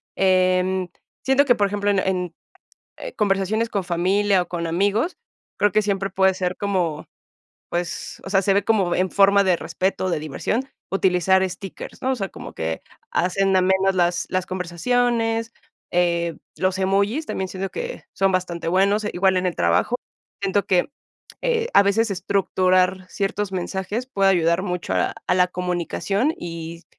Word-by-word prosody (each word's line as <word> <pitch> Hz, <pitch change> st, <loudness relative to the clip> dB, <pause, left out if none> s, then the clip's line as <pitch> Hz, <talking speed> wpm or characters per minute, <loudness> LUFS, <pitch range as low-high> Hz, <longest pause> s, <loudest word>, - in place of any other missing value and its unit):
eh, 185 Hz, -1 st, +3 dB
mm, 190 Hz, -1 st, -1 dB, 0.4 s
siento 270 Hz, +2 st, +4 dB
que, 245 Hz, -3 st, +4 dB
por 200 Hz, -1 st, +2 dB
ejemplo, 205 Hz, 0 st, 0 dB
en 195 Hz, -, +2 dB
en 180 Hz, -3 st, -2 dB, 0.8 s
conversaciones 210 Hz, +2 st, +1 dB
con 200 Hz, -3 st, -1 dB
familia 185 Hz, +2 st, +2 dB
o 175 Hz, -, -10 dB
con 170 Hz, -1 st, -3 dB
amigos, 205 Hz, -, 0 dB, 0.4 s
creo 205 Hz, -2 st, +3 dB
que 215 Hz, -, +3 dB
siempre 195 Hz, -1 st, -1 dB
puede 190 Hz, 0 st, +3 dB
ser 185 Hz, -1 st, -2 dB
como, 180 Hz, -6 st, -1 dB, 0.6 s
pues, 175 Hz, 0 st, -4 dB
o 195 Hz, -, -7 dB
sea, 195 Hz, 0 st, +3 dB
se 195 Hz, +1 st, +2 dB
ve 200 Hz, -, +2 dB
como 195 Hz, -6 st, +2 dB
en 185 Hz, 0 st, +1 dB
forma 200 Hz, 0 st, +5 dB
de 185 Hz, -2 st, +3 dB
respeto, 185 Hz, +3 st, -2 dB
de 155 Hz, -, -1 dB
diversión, 220 Hz, -, -2 dB, 0.2 s
utilizar 190 Hz, 0 st, +3 dB
stickers, 190 Hz, +1 st, -9 dB
¿no? 260 Hz, +1 st, +1 dB
O -, -, -1 dB
sea, 195 Hz, -4 st, -3 dB
como -, -, -9 dB
que 80 Hz, 0 st, -3 dB, 0.3 s
hacen 190 Hz, +2 st, +1 dB
amenas 190 Hz, +1 st, +3 dB
las 175 Hz, 0 st, +1 dB
las 185 Hz, 0 st, -1 dB
conversaciones, 225 Hz, +5 st, 0 dB, 0.4 s
eh, 170 Hz, -1 st, +1 dB, 0.2 s
los 185 Hz, 0 st, 0 dB
emojis 200 Hz, +10 st, +1 dB
también 190 Hz, -1 st, -3 dB
siento 190 Hz, +1 st, -4 dB
que 485 Hz, +1 st, -6 dB
son 195 Hz, 0 st, +2 dB
bastante 175 Hz, -2 st, -2 dB
buenos, 200 Hz, +4 st, +2 dB
igual 190 Hz, +1 st, +2 dB
en 185 Hz, -, -1 dB
el 175 Hz, -, -2 dB
trabajo. 85 Hz, -, +2 dB, 0.5 s
Siento 195 Hz, +1 st, +1 dB
que, 180 Hz, +7 st, +2 dB, 0.5 s
eh, 470 Hz, -1 st, +1 dB
a -, -, +8 dB
veces 205 Hz, +2 st, +1 dB
estructurar 185 Hz, -1 st, +1 dB
ciertos 200 Hz, 0 st, -2 dB
mensajes 190 Hz, +6 st, -3 dB
puede 195 Hz, -6 st, +2 dB
ayudar 170 Hz, 0 st, +2 dB
mucho 180 Hz, -3 st, -3 dB
a -, -, 0 dB
a -, -, +2 dB
la 180 Hz, 0 st, +4 dB
comunicación 180 Hz, -, -1 dB
y 170 Hz, 0 st, -7 dB
190 Hz, 160 wpm, -22 LUFS, 180-200 Hz, 0.8 s, a